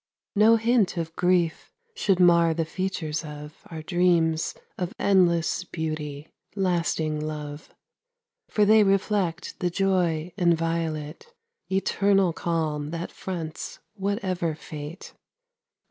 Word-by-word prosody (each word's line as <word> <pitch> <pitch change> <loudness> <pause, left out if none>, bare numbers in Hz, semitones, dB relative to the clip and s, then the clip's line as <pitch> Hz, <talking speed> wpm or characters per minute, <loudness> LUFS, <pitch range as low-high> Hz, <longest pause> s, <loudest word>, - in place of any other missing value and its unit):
No 215 +3 +6
hint 225 -4 +2
of 165 -1 -3
grief 175 -2 +1 0.2
should 195 - +1
mar 170 -2 +5
the 165 0 0
features 165 -3 -3
of 150 -1 -9
Our 160 -2 -7
dreams 170 -2 +2 0.2
of 180 0 -4
endless 180 -3 +3
beauty, 155 -3 -5 0.3
lasting 170 -5 0
love; 150 -1 -6 0.8
For 210 - +3
they 215 +1 +6
reflect 195 -3 0
the 180 - +1
joy 175 -3 0
inviolate, 165 - -1 0.4
Eternal 195 -1 +2
calm 155 -3 -2
that 170 +2 -5
fronts 165 -4 -6 0.2
whatever 190 -5 -1
fate. 150 +3 -8
170 Hz, 105 wpm, -26 LUFS, 155-190 Hz, 0.8 s, No